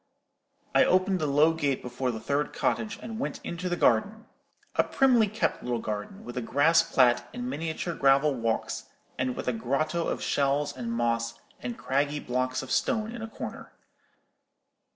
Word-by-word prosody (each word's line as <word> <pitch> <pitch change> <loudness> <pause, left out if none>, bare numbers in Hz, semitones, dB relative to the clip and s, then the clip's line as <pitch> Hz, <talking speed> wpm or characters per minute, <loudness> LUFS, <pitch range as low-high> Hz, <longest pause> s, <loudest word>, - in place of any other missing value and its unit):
I - - +6
opened 185 +1 +3
the 155 - 0
low 150 +3 +4
gate 145 -5 -1
before 125 +1 -2
the 115 -2 -3
third 140 +6 -1
cottage, 215 -2 -1
and 225 0 -6
went 275 - -3
into 175 +2 -4
the 175 - 0
garden,—a 205 - -1
primly 250 -5 +4
kept 215 +2 -1
little 120 -1 -1
garden, 105 -3 -5
with 120 - -7
a - - 0
grass 150 +8 +4
plat 125 -2 +3
and 245 0 -4
miniature 165 - -3
gravel 140 0 +4
walks, 115 -3 -2 0.3
and 130 -1 0
with - - -5
a 125 - +2
grotto 155 +8 -1
of - - -2
shells 145 +1 +1
and 120 -3 -4
moss 115 0 0 0.2
and 120 -1 -5
craggy 145 +2 0
blocks 130 0 -1
of 130 - -8
stone 220 - +1
in 235 -1 -7
a 225 - -4
corner. 220 - -8
140 Hz, 170 wpm, -28 LUFS, 125-175 Hz, 0.3 s, I